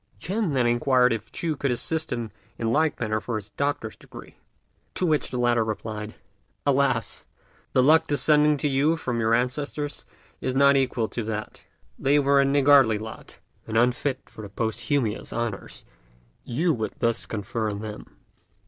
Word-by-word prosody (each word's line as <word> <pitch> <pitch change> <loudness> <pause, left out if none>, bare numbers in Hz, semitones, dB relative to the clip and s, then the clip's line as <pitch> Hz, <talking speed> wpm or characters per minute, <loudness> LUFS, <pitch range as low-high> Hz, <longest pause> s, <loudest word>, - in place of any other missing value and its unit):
Ch'ên 195 - -1
then 130 -3 +2
inquired 125 0 +3
if 110 -1 -6
Ch'u 165 -2 -2
could 140 0 -1
assist 160 +6 -2
him 115 -3 -3 0.3
in 115 0 -1
like 155 0 +1
manner 110 -2 -1
for 120 - -4
his 105 -1 -6
doctor's 140 -2 -2
degree; - - -13 0.6
to 185 - 0
which 155 -3 +1
the 125 - -4
latter 120 -1 +2
replied, 110 0 -5 0.5
"Alas! 135 -4 +1 0.5
the 130 - +4
luck 160 +3 +5
descending 150 0 +3
to 145 - -1
you 145 +4 +2
from 125 -7 -2
your 115 0 +3
ancestors 145 +4 -2 0.3
is 130 - -2
not 140 +1 +5
equal 125 -4 +1
to 115 - -4
that. 105 -1 -5 0.3
They 140 +2 +3
were 140 -1 +4
a - - +3
niggardly 135 -5 +5
lot, 110 +1 -9 0.3
and 110 0 -1
unfit 125 +3 +1
for - - -11
the 105 - -8
posthumous 115 +2 -1
honours 115 -4 -4 0.6
you 160 +8 0
would 110 -4 -3
thus 115 -1 0
confer 110 +1 -3
on 100 0 -5
them." 110 -1 -9
125 Hz, 165 wpm, -25 LUFS, 110-145 Hz, 0.6 s, luck